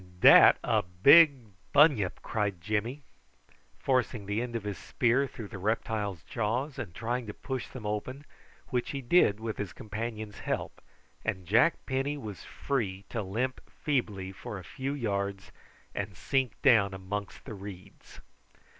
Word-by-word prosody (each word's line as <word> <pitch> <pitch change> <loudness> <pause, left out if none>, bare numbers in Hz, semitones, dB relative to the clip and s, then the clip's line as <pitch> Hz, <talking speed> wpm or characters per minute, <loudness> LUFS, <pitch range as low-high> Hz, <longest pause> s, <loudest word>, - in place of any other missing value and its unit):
"Dat - - +9
a - - +2
big 130 - +6 0.2
bunyip," 140 - +4
cried 100 -4 -1
Jimmy, 110 - -2 0.7
forcing 125 -5 0
the 105 +3 -1
end 120 -1 -5
of 115 - -2
his 105 -2 -4
spear 125 +3 +1
through 110 -5 -9
the 100 - -8
reptile's 105 -3 -2
jaws 125 +6 -2
and 100 -10 -6
trying 120 +1 -2
to 105 - -7
push 130 -3 -4
them 125 -5 -9
open, 130 +7 -4 0.4
which 125 -3 -1
he 140 - -4
did 120 - +4
with 110 -1 -4
his 100 -3 -4
companion's 110 -2 -6
help, - - -4 0.4
and 95 -2 -3
Jack 115 - +3
Penny 135 +2 -1
was 105 -8 -8
free 100 -9 -3
to 115 - -2
limp 115 +7 -2
feebly 105 -10 -2
for 95 +2 -7
a 95 - -9
few 135 +9 -4
yards, 100 -5 -3 0.4
and 100 -3 -4
sink 130 -6 -1
down 105 -8 +5
amongst 100 +2 -6
the - - -7
reeds. 95 -2 -11
110 Hz, 150 wpm, -29 LUFS, 100-130 Hz, 0.7 s, Dat